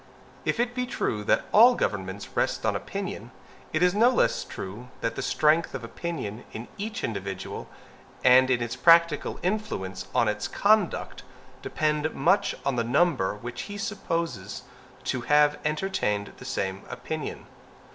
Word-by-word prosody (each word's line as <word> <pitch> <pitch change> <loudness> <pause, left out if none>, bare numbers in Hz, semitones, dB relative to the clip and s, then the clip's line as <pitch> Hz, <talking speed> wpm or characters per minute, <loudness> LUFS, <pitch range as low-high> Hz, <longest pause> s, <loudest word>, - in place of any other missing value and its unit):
If - - 0
it 240 0 +1
be 250 0 -2
true 110 - -2
that - - +2
all 240 +4 +8
governments 95 - -3
rest - - 0
on - - +1
opinion, - - -5 0.4
it 155 +3 +1
is 180 0 +4
no 225 +4 +5
less 255 - +2
true 105 +6 -8
that 115 - -1
the - - -3
strength 155 +2 +2
of - - -5
opinion 115 -4 -5
in 115 +2 -6
each 220 +2 -4
individual, 100 -3 -4 0.5
and 130 +1 +7
its 120 -1 0
practical 165 +2 +4
influence 180 - -2
on - - +4
his - - -1
conduct, 210 -3 +1 0.4
depend 150 0 -1
much 200 +9 +2
on 135 -3 0
the 115 - +2
number 125 - +2
which 120 +3 -6
he 205 - -5
supposes 165 - -3 0.4
to 130 - -2
have 150 +3 +4
entertained 150 - -1
the - - -11
same 95 0 -2
opinion. 155 -3 -5
150 Hz, 145 wpm, -27 LUFS, 110-180 Hz, 0.5 s, all